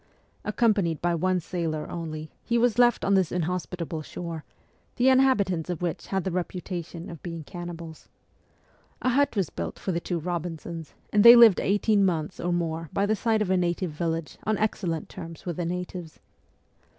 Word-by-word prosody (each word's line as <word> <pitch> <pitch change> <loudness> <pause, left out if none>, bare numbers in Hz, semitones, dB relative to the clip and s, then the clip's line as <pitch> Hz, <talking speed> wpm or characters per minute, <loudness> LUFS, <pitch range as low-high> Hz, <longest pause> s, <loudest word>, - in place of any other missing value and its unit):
Accom 215 +1 +3
panied 170 -6 -1
by 175 0 +1
one 185 +2 +1
sailor 165 -3 -3
only, 155 -2 -6
he 235 - +1
was 240 -1 +2
left 240 -1 +4
on 200 - +3
this 190 -4 +3
inhos 180 +1 -2
pitable 170 -3 -5
shore, 165 0 -6 0.5
the 250 +2 +4
inhabitants 205 -11 +3
of 175 0 -3
which 170 -2 -3
had 190 -2 -1
the 190 - -2
reputa 180 0 -3
tion 170 +1 -9
of 165 -3 -9
being 165 -2 -6
cannibals. 170 -1 -8 0.9
A 255 - +3
hut 280 0 +2
was 195 -6 0
built - - -5
for 190 - -3
the 170 - 0
two 170 0 -3
Eobinsons, 170 -1 -5 0.2
and 205 -1 +5
they 235 +1 +12
lived 230 -5 +8
eighteen 205 +1 +2
months 170 -2 -1
or 175 - -1
more 165 -2 -2
by 200 - +2
the 215 +1 +2
side 220 0 +1
of 190 - -2
a 190 - +4
native 175 0 0
village 165 0 -3
on 215 -1 0
excellent 180 -7 -1
terms 165 +2 -9
with 175 -3 -3
the 175 - -1
natives. 180 -1 -5
175 Hz, 185 wpm, -26 LUFS, 165-200 Hz, 0.9 s, they